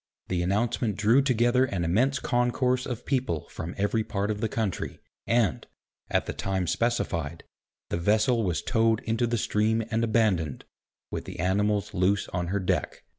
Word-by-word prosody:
The 90 Hz, -2 st, 0 dB
announcement 105 Hz, +3 st, 0 dB
drew 115 Hz, +6 st, +4 dB
together 125 Hz, -1 st, +3 dB
an 95 Hz, -9 st, -2 dB
immense 125 Hz, +11 st, +2 dB
concourse 125 Hz, +1 st, +1 dB
of 125 Hz, -2 st, -5 dB
people 130 Hz, -, -1 dB
from 85 Hz, +2 st, -6 dB
every 105 Hz, +2 st, +1 dB
part 100 Hz, 0 st, -2 dB
of 105 Hz, 0 st, -4 dB
the 115 Hz, -, 0 dB
country, 110 Hz, -5 st, -2 dB, 0.3 s
and, 115 Hz, -6 st, +1 dB, 0.4 s
at -, -, +1 dB
the -, -, -4 dB
time 95 Hz, -2 st, -1 dB
specified, 85 Hz, -7 st, -1 dB, 0.5 s
the -, -, -1 dB
vessel 110 Hz, +6 st, +2 dB
was 90 Hz, -6 st, -1 dB
towed 115 Hz, -2 st, +2 dB
into 115 Hz, +2 st, 0 dB
the 120 Hz, 0 st, 0 dB
stream 110 Hz, +1 st, +1 dB
and 115 Hz, +1 st, +1 dB
abandoned, 105 Hz, -, +1 dB, 0.5 s
with -, -, -4 dB
the -, -, -8 dB
animals 100 Hz, +3 st, +1 dB
loose 95 Hz, +2 st, +1 dB
on 90 Hz, -1 st, -2 dB
her 100 Hz, +3 st, 0 dB
deck. 95 Hz, -, -1 dB
110 Hz, 165 wpm, -27 LUFS, 95-120 Hz, 0.5 s, drew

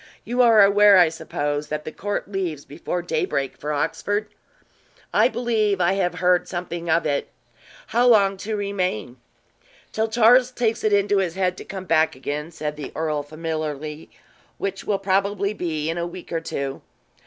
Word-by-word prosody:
You 245 Hz, +2 st, +1 dB
are 225 Hz, -4 st, +7 dB
aware, 200 Hz, 0 st, +6 dB
I 175 Hz, -3 st, +6 dB
suppose, 145 Hz, -2 st, -3 dB
that 150 Hz, +1 st, -4 dB
the 155 Hz, -, -5 dB
court 205 Hz, +5 st, -3 dB
leaves 180 Hz, -7 st, -3 dB
before 175 Hz, +4 st, -4 dB
daybreak 155 Hz, -5 st, -1 dB
for 150 Hz, -, -5 dB
Oxford." 205 Hz, +8 st, -1 dB, 0.9 s
"I -, -, +5 dB
believe 220 Hz, -5 st, 0 dB
I 175 Hz, +1 st, +3 dB
have 180 Hz, -3 st, 0 dB
heard 180 Hz, 0 st, +2 dB
something 175 Hz, -1 st, -5 dB
of 165 Hz, +1 st, +2 dB
it 145 Hz, -2 st, -1 dB, 0.6 s
how 245 Hz, +1 st, +2 dB
long 200 Hz, -4 st, +5 dB
to 215 Hz, +3 st, -4 dB
remain?" 185 Hz, -, -2 dB, 0.7 s
"Till 220 Hz, +1 st, 0 dB
Charles 240 Hz, +3 st, +5 dB
takes 235 Hz, -3 st, -1 dB
it 215 Hz, -, +2 dB
into 205 Hz, 0 st, +3 dB
his 180 Hz, -3 st, -1 dB
head 185 Hz, -1 st, 0 dB
to -, -, -8 dB
come 190 Hz, -1 st, -7 dB
back 160 Hz, -4 st, +2 dB
again," 145 Hz, +4 st, -4 dB
said 150 Hz, -2 st, -5 dB
the 145 Hz, -3 st, -6 dB
earl, 155 Hz, -2 st, -1 dB
familiarly, 155 Hz, 0 st, -5 dB, 0.5 s
"which 195 Hz, 0 st, -4 dB
will 205 Hz, -, +1 dB
probably 200 Hz, +1 st, 0 dB
be 160 Hz, -6 st, -3 dB
in 165 Hz, +1 st, -2 dB
a 170 Hz, -, -2 dB
week 180 Hz, +1 st, -10 dB
or 165 Hz, -1 st, -1 dB
two. 140 Hz, -4 st, -4 dB
180 Hz, 170 wpm, -23 LUFS, 155-205 Hz, 0.9 s, are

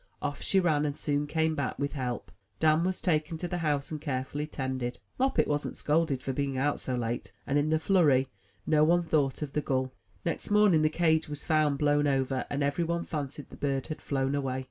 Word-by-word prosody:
Off 145 Hz, -1 st, -3 dB
she 195 Hz, -, +2 dB
ran, 155 Hz, -5 st, +2 dB
and 145 Hz, -1 st, -2 dB
soon 145 Hz, 0 st, -1 dB
came 160 Hz, +1 st, +1 dB
back 140 Hz, -4 st, -2 dB
with 145 Hz, 0 st, -2 dB
help. 125 Hz, -4 st, -4 dB, 0.3 s
Dan 155 Hz, +1 st, +4 dB
was 185 Hz, +1 st, -1 dB
taken 160 Hz, -1 st, 0 dB
to 175 Hz, -, -4 dB
the 175 Hz, 0 st, -3 dB
house 150 Hz, -3 st, -1 dB
and 155 Hz, -2 st, -4 dB
carefully 145 Hz, +1 st, -3 dB
tended; 130 Hz, -4 st, -3 dB, 0.2 s
Moppet 265 Hz, +1 st, +2 dB
wasn't 145 Hz, 0 st, -2 dB
scolded 150 Hz, -4 st, +1 dB
for 135 Hz, -, -2 dB
being 140 Hz, 0 st, -1 dB
out 145 Hz, +2 st, +1 dB
so 130 Hz, -, -3 dB
late; 120 Hz, 0 st, -3 dB
and, 140 Hz, +1 st, +2 dB
in 150 Hz, +1 st, +1 dB
the 160 Hz, -, +3 dB
flurry, 155 Hz, -7 st, +3 dB, 0.4 s
no 155 Hz, -1 st, +4 dB
one 175 Hz, +2 st, +4 dB
thought 150 Hz, -4 st, +1 dB
of 140 Hz, -2 st, -6 dB
the 150 Hz, -, +1 dB
gull. 130 Hz, -2 st, -1 dB, 0.3 s
Next 170 Hz, -, -2 dB
morning, 205 Hz, -6 st, +5 dB
the 155 Hz, -, +4 dB
cage 160 Hz, -1 st, +2 dB
was 150 Hz, -1 st, -6 dB
found 155 Hz, -3 st, +2 dB
blown 145 Hz, 0 st, +3 dB
over, 135 Hz, -1 st, 0 dB
and 145 Hz, 0 st, -1 dB
every 145 Hz, +4 st, +1 dB
one 170 Hz, +1 st, -1 dB
fancied 145 Hz, -1 st, -5 dB
the -, -, -9 dB
bird 135 Hz, -2 st, -1 dB
had 155 Hz, -, -5 dB
flown 135 Hz, -1 st, -1 dB
away. 135 Hz, -2 st, -1 dB
145 Hz, 215 wpm, -29 LUFS, 135-160 Hz, 0.4 s, morning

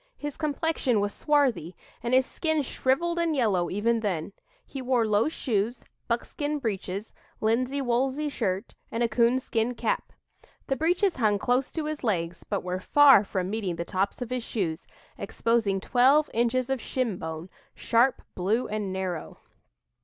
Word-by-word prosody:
His 290 Hz, -1 st, -5 dB
complexion 300 Hz, -6 st, 0 dB
was 205 Hz, 0 st, -1 dB
swarthy, 270 Hz, -, +1 dB, 0.3 s
and 240 Hz, +2 st, +1 dB
his 260 Hz, 0 st, +4 dB
skin 315 Hz, -1 st, -1 dB
shriveled 340 Hz, +7 st, 0 dB
and 335 Hz, -2 st, +1 dB
yellow 200 Hz, -9 st, +1 dB
even 230 Hz, +4 st, +1 dB
then. 195 Hz, -4 st, -2 dB, 0.3 s
He 270 Hz, -, -7 dB
wore 250 Hz, -2 st, +2 dB
low 215 Hz, +5 st, +2 dB
shoes, 235 Hz, -5 st, -2 dB, 0.2 s
buckskin 290 Hz, +5 st, -2 dB
breeches, 205 Hz, -4 st, -4 dB, 0.3 s
linsey 255 Hz, +5 st, +1 dB
woolsey 265 Hz, +4 st, 0 dB
shirt, 195 Hz, -8 st, -2 dB, 0.2 s
and 230 Hz, +1 st, 0 dB
a -, -, +3 dB
coonskin 235 Hz, 0 st, +1 dB
cap. -, -, -2 dB, 0.5 s
The 270 Hz, -, 0 dB
breeches 350 Hz, +4 st, +1 dB
hung 215 Hz, -4 st, +2 dB
close 250 Hz, +5 st, 0 dB
to 320 Hz, -2 st, -2 dB
his 305 Hz, -1 st, -4 dB
legs, 170 Hz, -6 st, -1 dB
but 200 Hz, -, -1 dB
were 180 Hz, 0 st, -3 dB
far 275 Hz, +1 st, +6 dB
from 190 Hz, -2 st, -3 dB
meeting 205 Hz, -5 st, -2 dB
the 170 Hz, +1 st, -4 dB
tops 195 Hz, +6 st, -1 dB
of 245 Hz, -, -10 dB
his 250 Hz, -2 st, -2 dB
shoes, 180 Hz, -8 st, -3 dB, 0.3 s
exposing 210 Hz, -1 st, 0 dB
'twelve 265 Hz, +8 st, +3 dB
inches 240 Hz, +3 st, +1 dB
of 265 Hz, -3 st, -1 dB
shinbone, 180 Hz, -9 st, -3 dB, 0.3 s
sharp, 240 Hz, +3 st, +2 dB
blue 210 Hz, +7 st, 0 dB
and 210 Hz, -2 st, -3 dB
narrow.'" 185 Hz, -4 st, -4 dB
235 Hz, 155 wpm, -27 LUFS, 200-270 Hz, 0.5 s, far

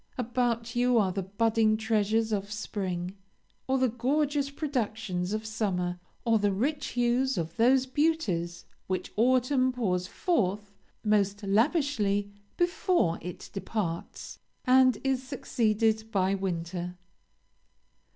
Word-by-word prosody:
About 240 Hz, -1 st, -1 dB
you 245 Hz, 0 st, +3 dB
are 195 Hz, -4 st, +3 dB
the 195 Hz, +2 st, -2 dB
budding 215 Hz, +3 st, +2 dB
treasures 220 Hz, 0 st, +1 dB
of 200 Hz, -1 st, -2 dB
spring, 190 Hz, -3 st, -3 dB, 0.5 s
or 265 Hz, 0 st, +2 dB
the 260 Hz, 0 st, +3 dB
gorgeous 280 Hz, +4 st, 0 dB
productions 220 Hz, -, -2 dB
of 215 Hz, +1 st, -2 dB
summer, 180 Hz, -5 st, -1 dB, 0.3 s
or 225 Hz, -2 st, +4 dB
the 205 Hz, -1 st, +2 dB
rich 270 Hz, +10 st, -1 dB
hues 245 Hz, +2 st, +1 dB
of 165 Hz, -1 st, -3 dB
those 255 Hz, +3 st, +4 dB
beauties 250 Hz, -, 0 dB, 0.2 s
which 185 Hz, 0 st, -3 dB
autumn 255 Hz, +3 st, +3 dB
pours 185 Hz, -8 st, -1 dB
forth 205 Hz, -, -1 dB, 0.3 s
most 205 Hz, -1 st, +1 dB
lavishly 210 Hz, -, +1 dB, 0.3 s
before 350 Hz, -, +1 dB
it 180 Hz, +1 st, -8 dB
departs, 195 Hz, -4 st, -4 dB, 0.3 s
and 255 Hz, -2 st, +5 dB
is 265 Hz, -2 st, +1 dB
succeeded 225 Hz, -4 st, 0 dB
by 190 Hz, -2 st, +2 dB
winter. 180 Hz, -1 st, -3 dB
220 Hz, 115 wpm, -28 LUFS, 195-255 Hz, 0.5 s, and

